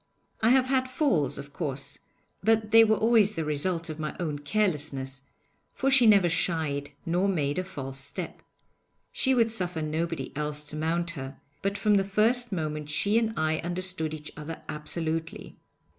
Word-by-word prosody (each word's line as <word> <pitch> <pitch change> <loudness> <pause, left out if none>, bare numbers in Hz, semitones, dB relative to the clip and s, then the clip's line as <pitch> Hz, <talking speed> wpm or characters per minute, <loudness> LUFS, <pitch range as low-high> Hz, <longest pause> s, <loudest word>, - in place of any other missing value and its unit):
I 220 - +4
have 255 +1 +5
had 260 -1 +1
falls, 255 - +1
of 140 0 -9
course, 140 -3 -4 0.4
but 220 0 +2
they 225 +1 +9
were 220 -1 +4
always 220 -2 +3
the 160 - -2
result 165 +3 -1
of 155 -1 -6
my 155 -1 -3
own 155 -5 -2
carelessness, 145 -6 -1 0.5
for 270 +1 +1
she 260 -3 +6
never 200 -4 +6
shied 160 -4 0 0.2
nor 180 +4 +1
made 145 -4 0
a - - -1
false 135 -7 -5
step. 145 +6 -3 0.7
She 265 -1 +1
would 230 -2 +3
suffer 180 -7 -1
nobody 165 +2 -3
else 150 0 -2
to 150 0 -8
mount 170 +2 -1
her, 135 -4 -7 0.2
but 200 +1 -1
from 205 +1 +3
the 195 - +3
first 225 +5 +1
moment 155 -4 -3
she 205 +8 +2
and 225 -1 -2
I 155 0 +1
understood 175 -2 -2
each 150 0 -9
other 155 +1 -7
absolutely. 160 +1 -3
170 Hz, 170 wpm, -28 LUFS, 150-210 Hz, 0.7 s, they